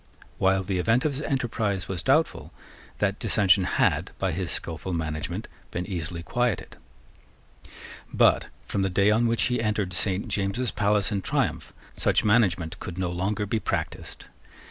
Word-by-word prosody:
While 95 0 +3
the 95 -1 -1
event 115 - +2
of 155 - +2
his 140 +1 -3
enterprise 110 - -1
was 90 -3 -3
doubtful, - - +1 0.5
that 100 0 0
dissension 100 -2 +3
had, - - +1
by 95 -1 0
his 90 +1 -3
skilful 85 +2 -2
management, 80 -2 -3 0.2
been 90 - -3
easily 85 -3 -4
quieted. 120 0 -1 1.4
But, - - +4 0.2
from 100 - -2
the 95 - +1
day 100 +3 +3
on 115 +2 +3
which 115 0 +1
he 125 -2 +1
entered 105 -4 -1
Saint 95 +1 -1
James's 100 +5 -1
palace 105 0 +2
in 100 -2 -1
triumph, - - -1 0.2
such - - +2
management 95 -7 +2
could 90 - -7
no 90 -2 -1
longer 100 +4 -1
be 110 +2 -1
practised. - - -4
100 Hz, 155 wpm, -26 LUFS, 90-110 Hz, 1.4 s, But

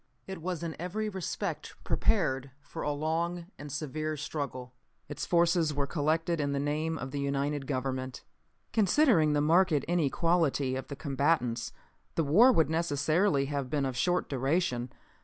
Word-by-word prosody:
It 190 -3 -7
was 175 -1 -3
in 165 -2 -4
every 215 +5 -2
respect 190 -3 -4
prepared 140 - +1
for 145 - -8
a 150 - 0
long 165 +4 -1
and 145 0 -8
severe 155 +2 -3
struggle. 140 -4 -5 0.3
Its - - -5
forces 170 -3 +3
were 140 -1 0
collected 160 +3 0
in 140 -1 -1
the 140 - 0
name 155 +3 -1
of 130 -2 -6
the 145 - -3
united 140 0 -1
government. 130 -1 -3 0.5
"Considering 205 - +4
the 145 - +2
marked 170 +3 +4
inequality 160 -4 +1
of 130 - -5
the 140 - -6
combatants 135 -4 0 0.4
the 165 - +2
war 205 - +6
would 160 -8 +2
necessarily 160 0 +2
have 140 -2 -3
been 140 0 0
of 130 -2 -3
short 180 +8 +1
duration. 135 -2 0
150 Hz, 155 wpm, -30 LUFS, 140-170 Hz, 0.5 s, war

